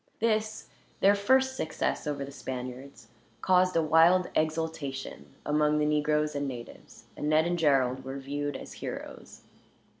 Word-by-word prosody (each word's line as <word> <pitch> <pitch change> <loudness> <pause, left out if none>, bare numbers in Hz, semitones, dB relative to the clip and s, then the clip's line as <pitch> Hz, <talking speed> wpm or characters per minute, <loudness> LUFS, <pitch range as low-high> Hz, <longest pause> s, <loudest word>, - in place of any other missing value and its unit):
This, 215 -1 0 0.3
their 200 +1 +5
first 260 +6 +2
success 160 -7 -2
over 140 -2 -2
the 140 - -10
Spaniards, 125 -2 -7 0.3
caused 185 0 +3
a 165 - +3
wild 165 +4 +4
exultation 155 - -3
among 150 0 +2
the 150 - +2
negroes 150 0 +1
and 145 0 -2
natives; 120 -3 -10
and 150 - -3
Ned 155 +1 +4
and 175 0 -1
Gerald 130 -4 +2
were 135 +1 -6
viewed 145 +1 -4
as - - -10
heroes. - - -8
150 Hz, 145 wpm, -29 LUFS, 140-170 Hz, 0.3 s, their